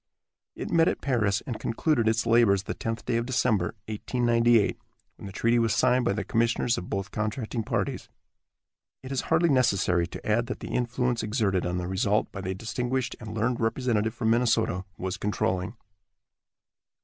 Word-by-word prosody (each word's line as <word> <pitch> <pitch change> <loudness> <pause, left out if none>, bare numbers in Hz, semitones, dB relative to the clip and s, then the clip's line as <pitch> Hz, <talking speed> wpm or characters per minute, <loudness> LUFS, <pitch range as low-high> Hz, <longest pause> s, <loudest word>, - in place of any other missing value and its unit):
It - - -6
met 165 -1 +4
at - - 0
Paris, 110 -8 +1
and 120 -4 -5
concluded 115 0 0
its 110 +1 +2
labors 115 -5 +4
the - - -4
tenth 115 -1 -4
day 115 - 0
of 115 +1 -2
December, 110 -7 +1
1898, 115 0 +2 0.4
when - - -9
the - - -7
treaty 115 +4 +2
was 115 -1 +2
signed 125 -1 +3
by 100 - +2
the 105 - -2
commissioners 115 +1 +1
of 90 - -6
both 95 +1 -3
contracting 110 +2 -2
parties. - - -2 0.9
It 130 - -8
is 135 - 0
hardly 165 +1 +3
necessary 100 - +2
to - - -10
add 115 +2 +1
that 125 - -5
the - - -7
influence 125 0 0
exerted 105 -5 0
on 90 0 -2
the 90 0 -3
result 100 +3 0
by 95 - -6
the 95 0 -3
distinguished 125 +5 -2
and 110 -1 -7
learned 115 +2 0
representative 115 -1 0
from 110 -2 +1
Minnesota 115 -6 +1
was 95 +1 -3
controlling. 100 0 -1
115 Hz, 175 wpm, -27 LUFS, 100-120 Hz, 0.9 s, met